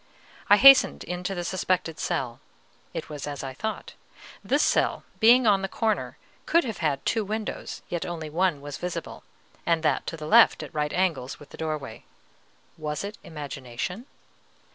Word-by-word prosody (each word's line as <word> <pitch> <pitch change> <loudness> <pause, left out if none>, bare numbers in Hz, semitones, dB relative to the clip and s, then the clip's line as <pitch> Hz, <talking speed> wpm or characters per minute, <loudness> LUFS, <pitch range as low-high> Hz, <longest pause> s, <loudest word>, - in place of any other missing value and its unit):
I 205 - +8
hastened 275 +3 +7
into 180 +2 -4
the 175 - -3
suspected 180 -3 -1
cell; 120 -2 -2 0.5
it 165 - -5
was 150 -1 -6
as 145 -2 -5
I 135 -1 -5
thought: 220 +11 -5 0.5
this - - +2
cell, - - +1 0.2
being 240 +3 +6
on 200 -3 +4
the 195 - -2
corner, 220 +2 -1 0.3
could 335 +1 +4
have 225 -5 -5
had 145 -5 -1
two 225 -2 +1
windows, 215 +1 -5
yet 175 -1 -3
only 165 -3 -5
one 165 -1 0
was 145 -1 -7
visible, 180 -1 -5 0.4
and 165 -1 +1
that 150 -4 +1
to 165 - -4
the 155 - -7
left, 155 - +6
at - - -10
right 150 -1 -1
angles 165 -9 -1
with 145 - -14
the - - -10
doorway. 155 -7 -5 0.8
Was 150 +1 -3
it 205 +1 -7
imagination? 145 - -6
165 Hz, 165 wpm, -26 LUFS, 150-200 Hz, 0.8 s, I